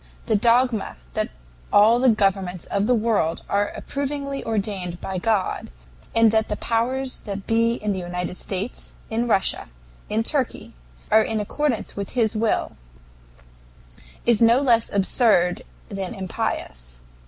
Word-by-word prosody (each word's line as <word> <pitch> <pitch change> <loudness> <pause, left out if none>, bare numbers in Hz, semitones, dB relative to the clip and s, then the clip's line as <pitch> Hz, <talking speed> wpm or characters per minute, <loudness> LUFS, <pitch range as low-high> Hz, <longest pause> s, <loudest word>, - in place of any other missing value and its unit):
"The 220 - +2
dogma 235 - +2 0.2
that - - -1 0.4
all 220 +4 +6
the 260 0 +5
governments 195 -4 +1
of 200 +1 0
the 250 - +4
world 215 -8 0
are 205 0 +1
approvingly 280 0 -4
ordained 200 -5 -2
of 190 -2 -3
God, 215 -3 0 0.5
and 230 -1 +6
that 220 0 +1
the 210 - -1
powers 255 +5 -1
that 200 -2 -6
be 230 0 +2
in 210 -2 -2
the 190 - -3
United 180 0 -4
States, 195 +5 -5 0.2
in 230 +2 0
Russia, 195 - +1 0.4
in 220 +1 +1
Turkey, 265 +1 -2 0.4
are 220 - +7
in 220 0 -1
accordance 245 +3 -1
with 200 -1 -5
his 220 -2 +2
will, 220 0 0 1.5
is 235 -2 +3
no 230 +1 +6
less 235 -5 +2
absurd 195 -3 +3 0.3
than 195 -2 -4
impious. - - -4
220 Hz, 140 wpm, -23 LUFS, 195-235 Hz, 1.5 s, are